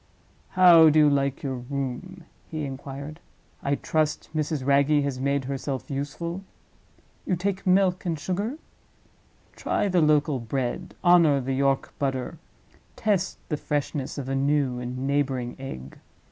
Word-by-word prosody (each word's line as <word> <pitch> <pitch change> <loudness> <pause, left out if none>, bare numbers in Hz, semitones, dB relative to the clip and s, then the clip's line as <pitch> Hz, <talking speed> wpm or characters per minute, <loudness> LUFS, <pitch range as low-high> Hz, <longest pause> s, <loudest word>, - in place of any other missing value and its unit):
"How 170 -3 +8
do 155 - +2
you 150 -1 +6
like 140 -1 0
your 135 -2 -2
room?" 140 +8 -5 0.3
he 155 -2 -3
inquired; 140 +3 -7 0.4
"I 140 0 0
trust 155 +1 -1
Mrs. 155 -3 -1
Wragge 140 +1 +3
has 140 -2 -3
made 140 0 0
herself 135 +2 -4
useful? 155 +6 -4 0.8
You 185 - 0
take 190 +2 -3
milk 185 -1 +3
and 170 -3 -1
sugar? 200 - -2 1.0
Try - - 0
the 180 -2 +3
local 150 -2 +3
bread, 130 +8 -3
honor 170 -5 +5
the 135 +1 -2
York 135 0 0
butter, 135 +3 -2 0.6
test 200 -4 0
the 150 - -1
freshness 145 -2 -3
of 135 -2 -4
a 135 - -2
new 135 -2 +1
and 125 +1 -4
neighboring 135 -4 -1
egg. 70 - -8
145 Hz, 140 wpm, -25 LUFS, 135-165 Hz, 1.0 s, How